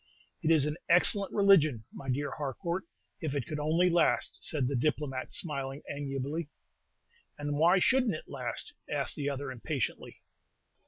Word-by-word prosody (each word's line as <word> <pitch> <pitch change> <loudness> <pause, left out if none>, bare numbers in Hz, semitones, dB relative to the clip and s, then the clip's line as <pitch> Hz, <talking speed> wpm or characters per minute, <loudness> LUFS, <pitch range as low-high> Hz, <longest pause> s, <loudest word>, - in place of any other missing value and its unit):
"It 160 - 0
is 155 -4 +5
an 150 +1 -2
excellent 190 +3 +4
religion, 155 - +4
my 135 - -7
dear 140 +3 -1
Harcourt, 165 +6 -3 0.4
if 150 -3 -2
it 135 -5 -1
could 150 +4 -4
only 160 +4 +3
last!" 170 -2 +2
said 140 -5 +1
the 140 - -1
diplomat, 135 -1 -1
smiling 140 -4 -2
amiably. 140 +2 -3 0.9
"And 145 0 -2
why 170 +5 +5
should 260 +7 +3
n't 210 - +1
it - - -9
last?" - - -4 0.2
asked - - -1
the 145 -1 -2
other, 140 0 -4
impatiently. 130 0 -4
150 Hz, 155 wpm, -30 LUFS, 140-170 Hz, 0.9 s, is